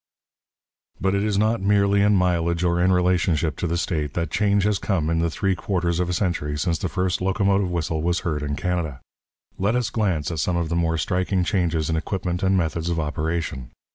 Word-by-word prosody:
But 95 0 +1
it 100 0 +1
is 105 -2 0
not 110 0 +1
merely 100 0 +3
in 105 0 +4
mileage 85 -2 +1
or 85 0 +2
in 95 +1 +4
relationship 90 -4 +1
to 90 - -2
the 85 +1 -1
state 75 -4 -2
that 85 -3 -2
change 100 +1 +2
has 105 -1 +1
come 80 -6 0
in 80 - +1
the 85 0 +1
three 95 +4 0
quarters 90 -3 -1
of 90 -1 0
a - - 0
century 85 -6 -1
since 80 +2 0
the 95 - -2
first 90 0 -1
locomotive 95 0 +1
whistle 80 -2 -2
was 85 +1 0
heard 75 -4 -2
in 75 0 -2
Canada. 85 -6 -2 0.6
Let 100 +5 +1
us 125 -2 0
glance 90 -9 0
at 80 - -3
some 85 +3 0
of 85 -2 -1
the 85 - -1
more 85 -1 +1
striking 90 +2 0
changes 85 -5 0
in 80 - 0
equipment 90 +1 -2
and 95 0 +2
methods 85 -1 -1
of 85 -1 -1
operation. 75 -3 -3
90 Hz, 210 wpm, -23 LUFS, 80-95 Hz, 0.6 s, in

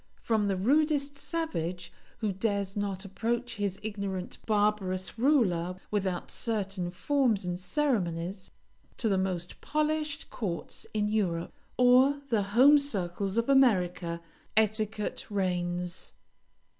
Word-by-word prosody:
From 220 -3 +2
the 195 - +1
rudest 285 - +2
savage 185 - -3 0.3
who 215 -2 +1
dares 200 0 -1
not 200 -1 -2
approach 235 +4 -2
his 200 -2 -2
ignorant, 200 -3 -4
barbarous 205 -2 0
ruler 190 - +2 0.2
without 190 -4 -1
certain 195 -6 -2
forms 225 +2 +1
and 180 0 -2
ceremonies, 185 - -1 0.5
to 230 - 0
the 195 -3 +2
most 180 -2 -3
polished 305 0 -1
courts 185 -7 -4
in 210 -1 0
Europe, 185 -6 -1 0.2
or 255 +3 +5
the 225 -4 +2 0.2
home 290 +4 +8
circles 195 -6 -2
of 230 - +2
America, 180 -10 +3 0.4
etiquette 215 -1 0
reigns. 180 -3 -2
205 Hz, 115 wpm, -29 LUFS, 185-245 Hz, 0.5 s, home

